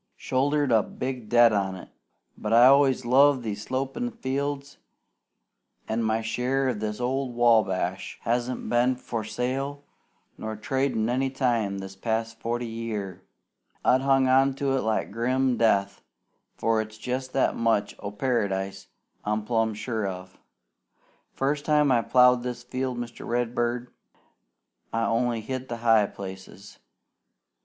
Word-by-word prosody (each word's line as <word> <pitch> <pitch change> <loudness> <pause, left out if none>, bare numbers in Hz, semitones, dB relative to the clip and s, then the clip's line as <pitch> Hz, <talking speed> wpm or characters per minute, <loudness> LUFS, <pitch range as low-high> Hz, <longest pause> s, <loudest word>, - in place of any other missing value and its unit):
Shouldered 145 +1 0
a 110 -2 +5
big 125 -1 -5
debt 120 -1 +6
on 95 -2 0
it; 90 - -11 0.5
but 105 - -5
I 120 +2 +7
always 135 -1 +5
loved 135 +1 +5
these 105 -2 -4
slopin' 135 - -2
fields, 140 - -4 1.1
an' 110 +1 -1
my 110 0 0
share 125 +4 0
of 115 -5 -2
this 105 0 -3
old 130 0 -2
Wabash 105 -6 +1
hasn't 120 +2 -1
been 120 +2 +2
for 115 -2 -5
sale 135 +5 -3 0.6
nor 110 0 -4
tradin' 125 0 -1
any 130 +2 0
time 120 -7 0
this 95 0 -7
past 115 +2 -2
forty 120 +1 -2
year. 110 -5 -5 0.6
I've 130 - +4
hung 135 -1 +3
on 135 +1 +4
to 135 -1 0
it 135 - +1
like 110 -2 -1
grim 125 +3 +1
death, 100 -4 +1 0.6
for 115 -1 +1
it's 110 0 -9
jest 130 +3 -4
that 135 - +2
much 110 -3 +1
o' - - -5
Paradise 100 -4 -2 0.4
I'm 105 0 -1
plumb 115 -2 0
sure 110 -2 -2
of. 90 -1 -8 1.0
First 145 +2 0
time 150 -2 +3
I 120 -2 +4
plowed 125 +1 +5
this 125 0 -5
field, 130 0 -3
Mr. 120 -1 -6
Redbird, 120 0 -1 1.0
I 115 0 0
only 115 0 0
hit 130 +2 -5
the 120 - -3
high 115 -3 +4
places. 95 +1 -10
120 Hz, 140 wpm, -26 LUFS, 110-130 Hz, 1.1 s, I